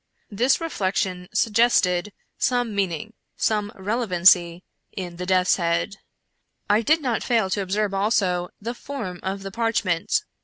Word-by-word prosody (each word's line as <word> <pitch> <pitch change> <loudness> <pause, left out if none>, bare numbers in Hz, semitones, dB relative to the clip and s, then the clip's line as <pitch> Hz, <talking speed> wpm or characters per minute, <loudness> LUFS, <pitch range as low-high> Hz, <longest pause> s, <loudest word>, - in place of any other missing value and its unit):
This 245 +6 +2
reflec 205 - -2
tion 180 -1 -1
suggested 210 -4 +2 0.3
some 245 -3 +1
meaning 200 +2 -2
— - - -52
some 210 -1 -1
relevancy 185 -4 +3 0.2
— - - -51
in 175 -3 -5
the 180 +1 -5
death's 185 -1 +3
head. 170 +3 -1 0.7
I 210 +2 +3
did 310 +6 +2
not 240 -4 0
fail 225 -6 +1
to 200 - 0
observe, 200 +2 -1
also, 195 -3 +1
the 230 +3 -4
form 230 -9 -6
of 195 +1 -4
the 195 - -6
parchment. 220 -7 0
195 Hz, 150 wpm, -23 LUFS, 180-225 Hz, 0.7 s, relevancy